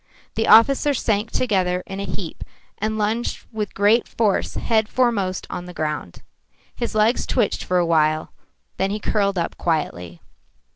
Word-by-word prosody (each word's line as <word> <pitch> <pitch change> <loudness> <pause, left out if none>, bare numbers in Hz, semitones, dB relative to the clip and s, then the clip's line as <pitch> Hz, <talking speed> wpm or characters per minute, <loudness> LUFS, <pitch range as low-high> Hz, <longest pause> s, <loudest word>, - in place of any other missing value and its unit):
The 225 - -1
officer 275 +5 +6
sank 215 -2 0
together 185 -6 0
in 195 0 -6
a 200 - -3
heap 180 -2 -6 0.4
and 215 +1 -1
lunged 220 +3 -1
with 215 -3 -4
great 210 +4 +3
force 215 -4 0
head 220 -1 +1
foremost 205 -8 0
on 175 - -5
the 180 -1 -10
ground. 150 - -4 0.5
His 235 -2 -4
legs 215 +3 +2
twitched 235 -6 0
for 180 - 0
a 175 - +3
while, 155 -1 +1 0.4
then 190 - 0
he 210 +2 -2
curled 200 -2 0
up 170 - -3
quietly. 90 - -2
200 Hz, 155 wpm, -22 LUFS, 180-220 Hz, 0.5 s, officer